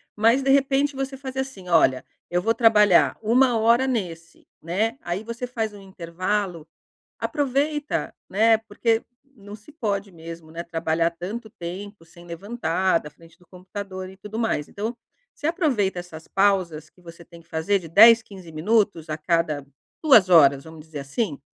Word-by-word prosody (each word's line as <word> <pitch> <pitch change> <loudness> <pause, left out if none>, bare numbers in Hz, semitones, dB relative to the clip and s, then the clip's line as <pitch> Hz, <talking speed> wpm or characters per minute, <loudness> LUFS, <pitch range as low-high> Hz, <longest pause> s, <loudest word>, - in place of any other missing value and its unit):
mas 230 +5 +3
de 270 - -1
repente 275 +1 +2
você 270 0 -4
faz 265 -1 -8
assim 260 -9 -5
olha 130 -6 +3 0.3
eu 175 0 +1
vou 225 +4 +1
trabalhar 210 -6 +5
1 240 +2 +3
hora 235 +4 +4
nesse, 170 -10 -5
né, 215 +9 -1
aí 175 +5 -3
você 235 +2 -5
faz 225 -3 -3
intervalo, 185 -2 -4 0.5
aproveita, 295 +1 -1 0.2
né, 220 +2 +4
porque 225 +1 -1 0.3
não 205 -1 -11
se 215 +7 -17
pode 205 - -3
mesmo, 165 -1 -10
né, 165 +1 -5
trabalhar 165 0 0
tanto 205 +7 -7
tempo 190 0 -8
sem 170 +1 -17
levantar 185 -1 -1
da 150 - -10
frente 165 +2 -20
do 180 - -24
computador 185 0 -8
e - - -15
tudo 210 +3 -9
mais, 225 -10 -1
então 220 +4 -4 0.4
você 295 - -4
aproveita 265 - 0
essas 165 -2 -10
pausas 185 -6 +1
que 180 - -26
você 170 0 -13
tem 170 0 -15
que 165 - -28
fazer 180 +5 0
de 165 - -10
10, 225 +6 +8
15 190 -6 -13
minutos 175 -1 0
a 155 - -3
cada 155 -3 -1 0.4
2 225 -11 +6
horas, 140 -5 +6
vamos 160 -1 -12
dizer 155 -2 -8
assim, 145 - -3
195 Hz, 165 wpm, -23 LUFS, 170-230 Hz, 0.5 s, 10